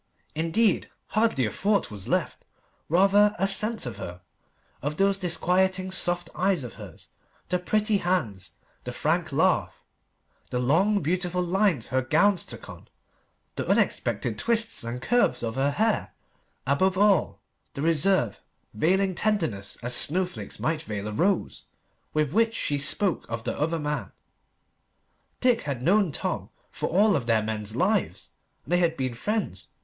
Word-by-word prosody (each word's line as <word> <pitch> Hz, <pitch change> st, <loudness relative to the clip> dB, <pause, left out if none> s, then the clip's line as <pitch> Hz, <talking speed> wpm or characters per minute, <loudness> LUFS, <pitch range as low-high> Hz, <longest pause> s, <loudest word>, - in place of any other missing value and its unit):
Indeed, 165 Hz, +7 st, +1 dB, 0.2 s
hardly 215 Hz, -, +1 dB
a 105 Hz, -, -2 dB
thought 205 Hz, -, 0 dB
was 100 Hz, -3 st, -8 dB
left, -, -, -1 dB, 0.5 s
rather 200 Hz, +5 st, +4 dB
a 195 Hz, -, +1 dB
sense 215 Hz, +1 st, +3 dB
of 120 Hz, -, -5 dB
her 90 Hz, +1 st, -7 dB, 0.6 s
of 145 Hz, +3 st, -3 dB
those 195 Hz, 0 st, +2 dB
disquieting 185 Hz, +1 st, +1 dB
soft 175 Hz, -1 st, 0 dB
eyes 185 Hz, -5 st, +1 dB
of 120 Hz, -, -7 dB
hers 100 Hz, -6 st, -12 dB, 0.4 s
the 180 Hz, 0 st, +1 dB
pretty 215 Hz, +3 st, +1 dB
hands, 130 Hz, -, -2 dB, 0.3 s
the -, -, -5 dB
frank -, -, 0 dB
laugh -, -, +1 dB, 0.7 s
the 125 Hz, -, -2 dB
long, 180 Hz, +12 st, +2 dB
beautiful 180 Hz, +2 st, -1 dB
lines 180 Hz, -, +1 dB
her 130 Hz, +1 st, +1 dB
gowns 195 Hz, +8 st, +2 dB
took -, -, -9 dB
on -, -, -12 dB, 0.7 s
the -, -, -3 dB
unexpected -, -, 0 dB
twists 230 Hz, -, +1 dB
and 120 Hz, +2 st, -5 dB
curves 245 Hz, -, +2 dB
of 115 Hz, -1 st, -2 dB
her 135 Hz, +3 st, +1 dB
hair 215 Hz, +9 st, 0 dB, 0.5 s
above 185 Hz, +8 st, +2 dB
all, 195 Hz, -, +3 dB, 0.4 s
the 140 Hz, -, -3 dB
reserve, 165 Hz, -, +1 dB, 0.3 s
veiling 190 Hz, -, +2 dB
tenderness 160 Hz, -, -1 dB
as 125 Hz, +1 st, -1 dB
snowflakes 180 Hz, +8 st, 0 dB
might 160 Hz, -1 st, -1 dB
veil 105 Hz, -8 st, -5 dB
a -, -, -4 dB
rose, 185 Hz, -, 0 dB, 0.5 s
with 150 Hz, -1 st, 0 dB
which 225 Hz, +1 st, +2 dB
she 145 Hz, -1 st, -1 dB
spoke 175 Hz, +6 st, +1 dB
of 115 Hz, 0 st, -4 dB
the -, -, -2 dB
other 160 Hz, +3 st, -1 dB
man. 150 Hz, -1 st, -3 dB, 1.3 s
Dick 250 Hz, -2 st, +3 dB
had 135 Hz, -4 st, -4 dB
known 195 Hz, +1 st, +3 dB
Tom -, -, -3 dB, 0.2 s
for -, -, -3 dB
all 205 Hz, +4 st, +4 dB
of 130 Hz, -5 st, -2 dB
their 110 Hz, -2 st, +2 dB
men's 110 Hz, 0 st, -4 dB
lives, -, -, 0 dB, 0.3 s
and 145 Hz, -, -10 dB
they -, -, +5 dB
had 165 Hz, -2 st, +1 dB
been 130 Hz, -2 st, -2 dB
friends. 120 Hz, -, -3 dB
175 Hz, 150 wpm, -26 LUFS, 130-195 Hz, 1.3 s, they